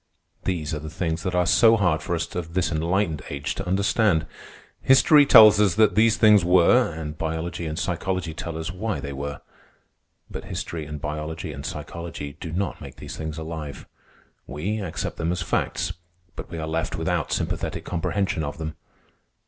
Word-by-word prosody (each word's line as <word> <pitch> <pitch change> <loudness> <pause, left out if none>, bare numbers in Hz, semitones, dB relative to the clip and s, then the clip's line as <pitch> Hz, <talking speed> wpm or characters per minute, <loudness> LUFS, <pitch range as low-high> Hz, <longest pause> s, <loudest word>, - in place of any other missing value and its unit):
These 80 -5 -2
are 75 - -2
the 75 +1 -7
things 80 0 -2
that 90 -2 -2
are 90 0 +3
so 115 +4 +5
hard 85 -6 +1
for 85 - -2
us 80 - -4
of 85 -1 -5
this 90 -2 +1
enlightened 85 0 0
age 70 0 -3
to 95 - -6
understand. 100 -2 +2 0.6
History 140 +2 +6
tells 110 -3 +9
us 100 -5 +3
that 110 -3 +4
these 110 +2 +4
things 105 -3 +6
were, 90 +7 +4
and 75 -1 -6
biology 80 +1 -3
and 80 0 -4
psychology 90 -1 -2
tell 80 0 -5
us 80 +2 -4
why 105 +3 -3
they 70 -1 -5
were; 70 0 -5 0.9
but - - -7
history 80 -3 -5
and 75 0 -6
biology 75 +1 -5
and - - -8
psychology 85 -4 -6
do 80 - -6
not 90 +2 -3
make - - -9
these - - -8
things 80 0 -5
alive. 80 -2 -6 0.6
We 90 +10 -3
accept 85 -5 -4
them 85 +1 -1
as 90 0 -2
facts, - - -1 0.4
but - - -8
we 85 - -6
are 80 - -3
left 80 +1 -2
without 80 -1 -1
sympathetic - - -2
comprehension 90 0 -1
of 70 -1 -5
them. 80 -1 -5
85 Hz, 180 wpm, -24 LUFS, 80-95 Hz, 0.9 s, tells